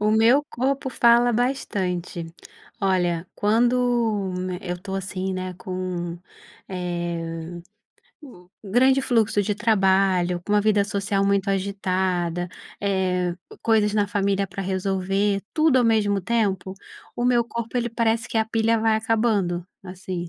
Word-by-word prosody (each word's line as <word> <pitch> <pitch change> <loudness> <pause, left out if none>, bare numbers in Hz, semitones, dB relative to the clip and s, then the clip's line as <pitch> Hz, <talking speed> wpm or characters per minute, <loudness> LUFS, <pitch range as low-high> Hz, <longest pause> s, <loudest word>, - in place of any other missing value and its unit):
O 210 +1 +2
meu 230 +6 +5
corpo 265 +2 -1
fala 240 0 +4
bastante. 185 -9 -2 0.5
Olha, 180 -4 +1
quando 230 -2 +1 0.3
eu 180 -2 -4
tô 195 0 -5
assim, 190 0 -3
né, 185 0 -4
com, 180 -1 -5 0.5
eh, 175 -2 -4 0.6
o 180 -11 -14 0.2
grande 260 +6 +3
fluxo 220 -5 +2
de 205 - -1
trabalho, 190 -4 +2
com 205 - -2
uma 210 - +4
vida 205 -1 +3
social 200 0 -1
muito 200 0 +1
agitada, 185 -3 -1 0.3
eh, 185 -3 0 0.3
coisas 215 -2 +3
na 205 -1 +2
família 200 0 0
pra 195 - -6
resolver, 195 +1 0
tudo 310 -4 +3
ao 245 - +3
mesmo 205 -3 +2
tempo, 195 -3 -1 0.4
o 240 - -1
meu 245 -1 +4
corpo 235 0 -5
ele 240 -1 0
parece 230 0 0
que 225 - 0
a 220 - +2
pilha 225 +1 +1
vai 220 0 +2
acabando, 215 -6 0 0.2
assim. 180 -2 -6
200 Hz, 135 wpm, -23 LUFS, 185-225 Hz, 0.6 s, meu